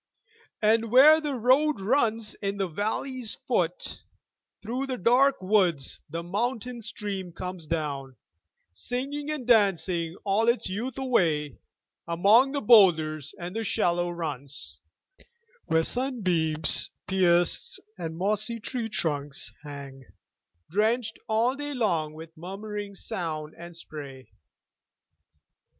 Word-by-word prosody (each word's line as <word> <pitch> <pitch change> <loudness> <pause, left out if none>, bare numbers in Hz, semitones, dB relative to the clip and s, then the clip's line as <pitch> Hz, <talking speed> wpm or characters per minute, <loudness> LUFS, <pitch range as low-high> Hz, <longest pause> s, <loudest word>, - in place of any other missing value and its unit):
And 225 +1 +3
where 295 +7 +7
the 295 -3 -2
road 260 +5 +3
runs 225 0 +1
in 200 0 -2
the 195 -1 0
valley's 220 - -2
foot, - - -1 0.6
Through 250 +5 -3
the 260 -1 -3
dark 255 +7 +4
woods 185 -8 +1
the 165 +3 -4
mountain 235 +6 -2
stream 205 -5 -5
comes 180 -1 -6
down, 140 -5 -3 0.6
Singing 270 - -4
and 300 -5 -3
dancing 185 -7 +2
all 210 +3 +2
its 235 - +1
youth 225 +8 -4
away 165 - +1 0.5
Among 205 +10 +4
the 285 0 -2
boulders 160 - +4
and 175 +3 -6
the 225 - -1
shallow 175 -3 +1
runs, 150 -3 -6 0.9
Where 160 0 +2
sunbeams 180 - +2 0.2
pierce 175 -2 +2 0.2
and 165 -4 -6
mossy 215 +5 -1
tree 230 0 -4
trunks 145 -7 -2
hang, 140 -2 -9 0.7
Drenched 220 +3 +1
all 225 +3 +2
day 290 0 -5
long 170 -10 0
with 160 +1 -11
murmuring 200 +4 -6
sound 155 -5 -4
and 170 0 -11
spray. 140 -5 -10
195 Hz, 115 wpm, -27 LUFS, 165-235 Hz, 0.9 s, where